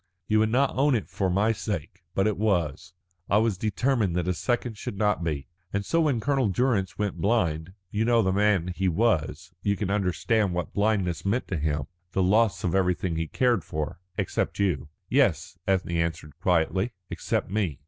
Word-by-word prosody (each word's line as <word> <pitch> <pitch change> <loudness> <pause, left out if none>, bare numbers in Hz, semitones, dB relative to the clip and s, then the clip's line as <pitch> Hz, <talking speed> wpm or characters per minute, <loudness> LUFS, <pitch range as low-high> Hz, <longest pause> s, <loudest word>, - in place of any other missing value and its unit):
You 110 0 +3
would 110 0 +3
not 135 +4 +2
own 140 0 +3
it 110 - -2
for 95 -2 -1
my 100 +5 +2
sake, 95 -5 -4
but 95 - +2
it 110 -1 +1
was. 85 -5 -1 0.4
I 100 - +4
was 110 -1 +2
determined 110 0 0
that 90 -1 0
a 90 - +2
second 120 +5 -1
should 100 - -6
not 105 -4 +1
be. 75 -4 -2 0.3
And 100 0 -2
so 165 +8 +2
when 145 -7 +2
Colonel 135 -1 +1
Durrance 100 -3 0
went 105 -2 -2
blind 90 -6 +1 0.2
you 105 +1 0
know 115 0 +4
the 95 - +2
man 100 -3 +2
he 95 +1 0
was, 90 -4 0
you 100 0 +1
can 100 -2 -2
understand 100 0 +1
what 90 - -3
blindness 100 -5 +1
meant 110 +6 0
to 90 - -1
him, 75 -1 0 0.3
the 95 - +2
loss 100 -1 +3
of 85 - 0
everything 90 -2 +1
he 80 0 -2
cared 120 -1 +2
for 80 -1 -4
" 90 - -38
"Except - - -1
you." 85 -9 0 0.2
"Yes," 95 - +1
Ethne 95 -2 +1
answered 80 -3 -2
quietly, 95 +4 +1 0.2
"except - - -2
me. 95 -9 -1
95 Hz, 190 wpm, -26 LUFS, 85-110 Hz, 0.4 s, I